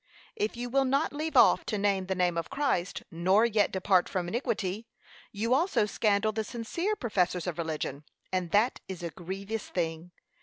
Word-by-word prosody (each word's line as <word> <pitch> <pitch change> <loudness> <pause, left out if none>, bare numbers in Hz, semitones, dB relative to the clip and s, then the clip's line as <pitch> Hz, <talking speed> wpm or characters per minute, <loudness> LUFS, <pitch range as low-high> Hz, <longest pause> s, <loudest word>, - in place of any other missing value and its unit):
If 215 +3 -2
you 245 +1 -3
will 270 +3 +2
not 275 +4 +1
leave 310 +2 -2
off - - +6
to 215 - -1
name 195 -2 +1
the 190 - -1
name 180 -2 +1
of 170 - -3
Christ, 270 -10 -1
nor 185 +6 +3
yet 215 -3 +2
depart 190 -1 +2
from 180 -3 -2
iniquity, 215 -2 -2 0.4
you 225 +4 0
also 270 - +2
scandal 210 0 +1
the 220 0 -2
sincere 260 - -2
professors 180 - 0
of 175 -2 -4
religion, 155 -3 -3 0.3
and 180 -2 0
that 210 +7 +2
is 185 -2 -7
a 170 - -3
grievous 195 +5 -5
thing. 165 -1 -3
200 Hz, 180 wpm, -29 LUFS, 180-235 Hz, 0.4 s, off